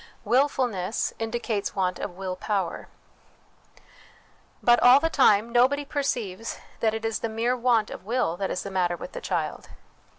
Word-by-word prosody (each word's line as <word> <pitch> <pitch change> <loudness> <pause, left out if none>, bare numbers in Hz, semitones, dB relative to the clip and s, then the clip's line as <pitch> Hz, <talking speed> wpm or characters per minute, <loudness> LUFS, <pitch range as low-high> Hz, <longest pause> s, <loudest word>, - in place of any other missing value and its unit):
Wilfulness 240 -5 +1
indicates 225 -2 -2
want 185 -2 -1
of 180 -3 -6
Will 190 -1 -4
Power. 195 -3 -3 1.8
But, 240 0 +5
all 250 +2 +8
the 325 +2 -1
time, 230 -5 +4
nobody 260 +4 +3
perceives 235 -8 -3 0.2
that 220 -1 +1
it 225 0 -4
is 225 -1 -1
the 230 - -3
mere 230 +3 0
want 235 -3 +1
of - - -8
will 230 -5 0
that 195 0 -2
is 180 - -3
the 200 - -6
matter 175 -2 0
with - - -8
the - - -7
child. - - -3
225 Hz, 160 wpm, -26 LUFS, 195-250 Hz, 1.8 s, all